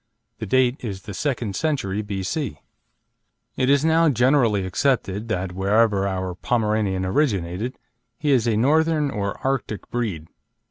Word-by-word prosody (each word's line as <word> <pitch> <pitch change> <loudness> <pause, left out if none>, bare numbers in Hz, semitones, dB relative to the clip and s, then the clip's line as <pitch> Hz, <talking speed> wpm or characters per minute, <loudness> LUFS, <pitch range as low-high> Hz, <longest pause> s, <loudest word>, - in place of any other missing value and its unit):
The 110 - -4
date 130 +3 +3
is 100 -5 -5
the 105 - -7
second 120 -4 -2
century, 120 -11 -1
B.C. 100 - -3 1.0
It 130 - +1
is 140 +2 +4
now 165 0 +4
generally 120 -6 +3
accepted 105 0 0
that, 95 -4 -2
wherever 100 +1 +2
our 95 -1 -2
Pomeranian 105 -2 0
originated, 100 - -1 0.4
he 150 -1 0
is 120 -4 +3
a 110 -2 +2
Northern 150 +3 +2
or 100 -3 -3
Arctic 135 -6 -2
breed. 105 -10 -2
110 Hz, 135 wpm, -23 LUFS, 95-135 Hz, 1.0 s, is